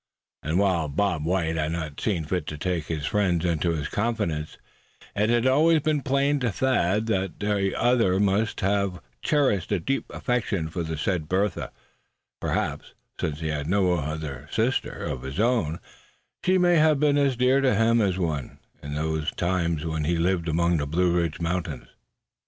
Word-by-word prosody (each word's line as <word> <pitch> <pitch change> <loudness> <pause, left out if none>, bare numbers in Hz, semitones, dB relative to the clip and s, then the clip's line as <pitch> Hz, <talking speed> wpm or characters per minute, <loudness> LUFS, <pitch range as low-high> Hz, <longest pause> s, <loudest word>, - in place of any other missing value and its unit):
And 80 +4 -1
while 95 -5 +2
Bob 80 +1 0
White 85 -2 0
had 80 +1 -1
not 80 -4 -5
seen 90 -8 -1
fit 85 0 -2
to 75 - -5
take 85 0 -2
his 75 -3 -3
friend 90 -1 +1
into 85 0 +1
his 80 -4 -1
confidence 105 -9 -2 0.6
it 105 +2 +1
had 120 +1 +2
always 155 +5 +4
been 150 -1 +1
plain 140 +1 +1
to 125 -4 0
Thad 110 -4 +1
that 95 -6 -1
the 100 -2 0
other 115 -7 +3
must 105 +2 +1
have 100 -2 0 0.2
cherished 130 - +1
a 100 - +2
deep 135 +11 -1
affection 105 -9 -1
for 85 - -3
the 80 -1 -3
said 80 -1 -1
Bertha; 95 0 0 0.7
perhaps, - - -3 0.2
since 75 0 -3
he 80 - -2
had 75 -1 -2
no 80 -7 -1
sister 120 - -1
of 65 - -4
his 65 +6 -6
own, 110 -9 +1 0.6
she 185 +1 +3
may 175 -1 +4
have 155 -2 +4
been 145 -1 +3
as 140 -2 +2
dear 125 +3 +3
to 130 -5 +3
him 115 +2 +3
as 95 -3 +1
one, 80 -7 -3 0.2
in 70 0 -6
those 80 0 -1
times 85 -3 -1
when 80 -2 -2
he 85 +2 +1
lived 85 0 0
among 85 +2 +2
the 70 -1 -2
Blue 85 +4 +2
Ridge 85 -3 0
mountains. 85 +1 -3
90 Hz, 175 wpm, -25 LUFS, 80-115 Hz, 0.7 s, always